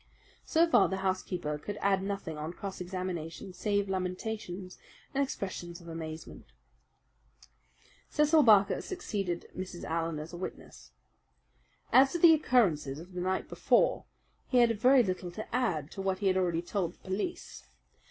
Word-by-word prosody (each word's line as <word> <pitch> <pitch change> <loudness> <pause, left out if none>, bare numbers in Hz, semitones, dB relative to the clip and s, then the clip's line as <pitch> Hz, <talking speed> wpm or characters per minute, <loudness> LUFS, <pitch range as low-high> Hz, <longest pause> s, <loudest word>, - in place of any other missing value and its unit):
So 330 +1 +3
far 330 - +5
the 190 - -2
housekeeper 180 -5 -2
could 205 +7 -6
add 195 -1 +2
nothing 195 -5 -4
on 155 +3 -5
cross 195 0 -6
examination 180 -1 -5
save 200 +1 0
lamentations 185 0 -4 0.3
and 280 +1 +2
expressions 185 -8 -5
of 170 - -14
amazement. 160 -1 -7 1.6
Cecil 300 +1 +4
Barker 210 -6 +5
succeeded 195 - -3
Mrs. 185 -2 -6
Allen 165 -1 -2
as 155 +3 -7
a - - -6
witness. 185 - -8 1.0
As 270 +1 +6
to - - +1
the 335 -1 +8
occurrences 180 - +2
of 175 +4 -11
the 180 - -3
night 185 +1 -1
before, - - +2 0.4
he 255 - +1
had 240 -1 +6
very 255 +2 +6
little 185 -3 -3
to 215 +4 -5
add 170 - 0
to 195 - -6
what 190 -1 0
he 205 - -4
had 190 -1 +3
already 175 -3 +1
told 175 -2 -2
the - - -31
police. 210 - -4
190 Hz, 150 wpm, -30 LUFS, 175-215 Hz, 1.6 s, the